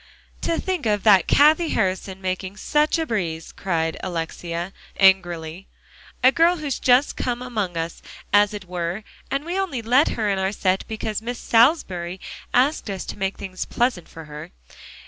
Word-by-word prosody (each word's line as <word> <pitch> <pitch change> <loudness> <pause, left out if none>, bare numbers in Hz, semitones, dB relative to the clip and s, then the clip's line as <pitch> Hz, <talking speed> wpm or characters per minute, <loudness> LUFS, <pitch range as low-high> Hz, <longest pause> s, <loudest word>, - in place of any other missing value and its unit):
"To 335 - 0
think 365 -10 -2
of 210 -2 +1
that 200 -4 +6
Cathie 310 +3 +5
Harrison 190 -1 -1
making 185 +1 -3
such 300 +8 +1
a 325 - -1
breeze," 170 - -3
cried 165 -3 -2
Alexia 170 +1 -4 0.3
angrily; 175 -2 +2 0.6
"a 260 - +7
girl 335 +5 +3
who's 295 -5 -3
just 255 +3 +3
come 245 -1 -2
among 210 -8 -3
us, 165 0 -4 0.3
as 205 0 +5
it 205 -2 -7
were, 175 +3 -4 0.3
and 275 +2 -2
we 355 +3 -2
only 285 -12 -2
let 255 +7 +4
her 220 -2 0
in 195 -1 0
our 190 0 0
set 190 -1 0
because 220 -1 -3
Miss 240 +2 -4
Salisbury 190 - +2 0.3
asked 260 -1 +2
us 195 -2 -4
to - - -7
make 195 0 -2
things 185 -2 -5
pleasant 240 -8 -1
for 160 -1 -10
her. 150 0 -9
200 Hz, 165 wpm, -23 LUFS, 180-250 Hz, 0.6 s, a